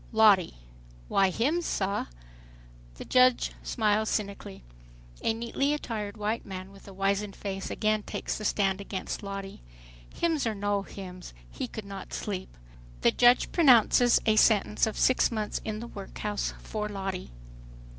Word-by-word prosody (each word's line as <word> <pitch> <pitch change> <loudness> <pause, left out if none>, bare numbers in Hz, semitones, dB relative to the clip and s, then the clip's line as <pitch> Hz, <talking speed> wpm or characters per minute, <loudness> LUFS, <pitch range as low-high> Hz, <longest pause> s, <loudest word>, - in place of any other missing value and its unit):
LOTTIE: 210 -5 +5 0.5
"Why, 195 -1 +4
hymns, 300 - 0
sah." 200 0 -1 0.9
The - - -9
judge 255 -1 +4
smiles 215 -1 +1
cynically. 200 - -4 0.6
A - - +2
neatly 235 +6 0
attired 215 -7 -5
white 215 +2 -2
man 190 0 -8
with 195 0 -16
a - - -9
wizened 195 +1 -1
face 195 -1 -5
again 215 0 0
takes - - -4
the 215 - -6
stand 195 -2 +1
against 195 -1 -5
Lottie. 195 -1 -6 0.5
Hymns 320 -7 0
or 220 - -1
no 205 0 0
hymns 185 - -9 0.2
he - - -4
could 215 - -8
not 195 -1 -8
sleep. 190 - -5 0.4
The - - +5
judge 245 - +4
pronounces 245 - +5
a 220 -1 +3
sentence 215 0 +4
of 220 - -4
"six 255 - +4
months 215 -2 -3
in 215 0 -4
the 235 - -6
workhouse," 205 0 -4
for 210 -1 -4
Lottie. 195 -2 -4
210 Hz, 145 wpm, -28 LUFS, 195-225 Hz, 0.9 s, LOTTIE